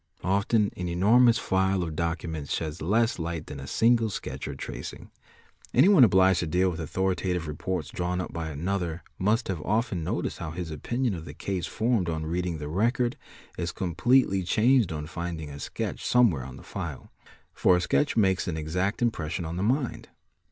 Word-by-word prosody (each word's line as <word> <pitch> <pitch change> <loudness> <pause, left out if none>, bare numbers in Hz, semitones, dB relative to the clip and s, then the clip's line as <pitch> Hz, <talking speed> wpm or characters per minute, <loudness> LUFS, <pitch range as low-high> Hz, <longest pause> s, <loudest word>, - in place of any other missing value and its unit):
Often 100 +3 +2
an 90 - -4
enormous 115 +7 +5
file 95 -2 +1
of 80 -2 -4
documents 80 -3 -3
sheds 80 0 -4
less 110 +6 +1
light 85 -1 -3
than 75 - -8
a 70 - -8
single 115 - +3
sketch 100 - -5
or - - -5
tracing. - - -7 0.6
Anyone 190 -7 +7
obliged 95 -3 +5
to 85 - -1
deal 90 +3 +2
with 80 - -6
authorita: 95 +3 -1
tive 85 -2 -3
reports 80 +2 -3
drawn 90 0 -2
up 90 - -5
by 80 -1 -3
another 85 +2 -3 0.2
must 110 +5 +1
have 90 -5 -3
often 105 -2 0
noticed - - -2
how 80 - -4
his 80 0 -5
opinioi 120 - -1
of 80 -1 -7
the - - -9
case 95 -3 -3
formed 110 -6 0
on 80 -1 -2
reading 85 +1 -2
the 75 -1 -6
record 120 - +1 0.4
is 85 0 -1
completely 95 +3 +2
changed 115 +4 +3
on 75 -1 -4
findin, 85 -1 -5
a 70 0 -8
sketch - - -4
somewhere 105 - +3
on 65 0 -9
the - - -12
file; - - -6 0.4
for 90 - +4
a - - 0
sketch 145 +9 +1
makes 95 -4 +2
an 85 -3 -2
exact 90 +8 -1
impress 85 -9 -1
61 85 -2 -3
on 85 - -4
the - - -1 0.2
mind. 125 - -6
90 Hz, 185 wpm, -27 LUFS, 80-105 Hz, 0.6 s, Anyone